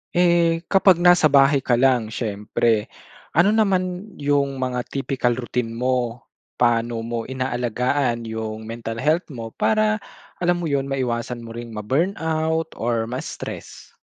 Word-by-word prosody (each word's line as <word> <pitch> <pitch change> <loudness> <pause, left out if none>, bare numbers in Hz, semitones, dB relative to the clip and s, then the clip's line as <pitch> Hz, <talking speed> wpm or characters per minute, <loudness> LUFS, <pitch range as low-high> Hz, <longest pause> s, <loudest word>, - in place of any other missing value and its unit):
Eh, 170 -1 +3
kapag 190 -3 +5
nasa 175 -3 +6
bahay 140 0 +5
ka 125 -2 +1
lang 125 -3 +3
siyempre, 110 0 -1 0.5
ano 185 +5 +5
naman 195 -2 0
'yung 140 -1 0
mga 125 -2 -3
typical 135 -3 -1
routine 120 -2 -3
mo? 125 -1 -1 0.3
Pa'no 115 -1 +1
mo 115 -1 -4
inaalagaan 125 -1 -1
'yung 110 -1 -5
mental 115 0 -6
health 160 +4 +2
mo 115 -6 -7
para, 215 0 +1 0.4
alam 175 0 +1
mo - - -1
'yun, 135 -1 0
maiwasan 120 -3 -2
mo 115 - -9
ring 115 -1 -8
ma-burnout 160 - -1
or 115 -1 0
ma-stress? 125 +3 -7
130 Hz, 130 wpm, -22 LUFS, 115-160 Hz, 0.5 s, nasa